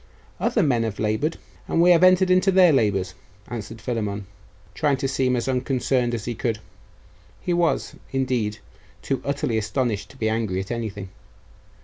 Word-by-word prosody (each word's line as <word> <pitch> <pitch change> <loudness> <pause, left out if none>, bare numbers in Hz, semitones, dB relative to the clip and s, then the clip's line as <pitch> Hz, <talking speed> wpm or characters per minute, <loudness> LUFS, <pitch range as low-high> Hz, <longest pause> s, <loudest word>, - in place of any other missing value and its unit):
'Other 215 - +2
men 125 -6 +2
have 110 -3 -2
laboured, 110 +9 0 0.3
and - - 0
we 175 +1 +6
have 175 0 +5
entered 185 0 +5
into 185 +1 +4
their 180 -3 +6
labours,' 95 -7 +1 0.4
answered 115 -1 -6
Philammon, 105 -3 -3 0.5
trying 140 +5 +1
to 135 - -1
seem 130 -1 +1
as 120 +1 -2
unconcerned 125 -1 0
as 110 - -5
he 120 - -2
could. 115 -1 -2 0.8
He 180 - -1
was, 170 -1 +1 0.2
indeed, 125 -5 -1 0.5
too 135 - -1
utterly 140 -5 -1
astonished 110 -2 -2
to 135 - -16
be 110 - -1
angry 110 -4 -1
at 95 +3 -5
anything. 105 -5 -4
120 Hz, 160 wpm, -24 LUFS, 110-140 Hz, 0.8 s, we